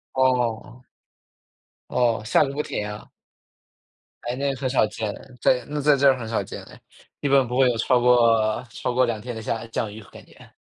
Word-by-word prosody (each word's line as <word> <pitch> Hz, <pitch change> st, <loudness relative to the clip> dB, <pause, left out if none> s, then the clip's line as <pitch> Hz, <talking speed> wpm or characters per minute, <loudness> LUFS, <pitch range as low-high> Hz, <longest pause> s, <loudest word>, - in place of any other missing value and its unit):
哦。 125 Hz, -2 st, 0 dB, 1.1 s
哦， 115 Hz, -3 st, +1 dB
下 -, -, +3 dB
个 135 Hz, -, -5 dB
不 150 Hz, +2 st, -2 dB
停 105 Hz, -, -4 dB
啊。 105 Hz, 0 st, -9 dB, 1.1 s
哎， 120 Hz, +1 st, -3 dB
那 140 Hz, +1 st, -1 dB
很 130 Hz, 0 st, -3 dB
少 125 Hz, -4 st, +3 dB
见， 105 Hz, 0 st, -4 dB, 0.3 s
在 125 Hz, -2 st, +2 dB
那 150 Hz, 0 st, -3 dB
在 145 Hz, 0 st, +4 dB
这 140 Hz, +1 st, +4 dB
儿 130 Hz, -, +4 dB
很 115 Hz, -3 st, -6 dB
少 110 Hz, -3 st, -1 dB
见 -, -, -8 dB
了。 -, -, -14 dB, 0.4 s
一 -, -, 0 dB
般 135 Hz, -2 st, +4 dB
不 125 Hz, +2 st, -3 dB
会 135 Hz, -, +5 dB
有 120 Hz, -, -1 dB
超 125 Hz, +2 st, +2 dB
过 115 Hz, -3 st, +3 dB
超 125 Hz, -, -4 dB
过 130 Hz, +1 st, +3 dB
2 115 Hz, -3 st, -2 dB
天 120 Hz, +1 st, -7 dB
的 110 Hz, -, -6 dB
下 115 Hz, +1 st, -3 dB
降 110 Hz, -1 st, -3 dB
雨 110 Hz, +2 st, -10 dB
感 -, -, -13 dB
觉。 -, -, -18 dB
120 Hz, 210 characters per minute, -23 LUFS, 110-130 Hz, 1.1 s, 会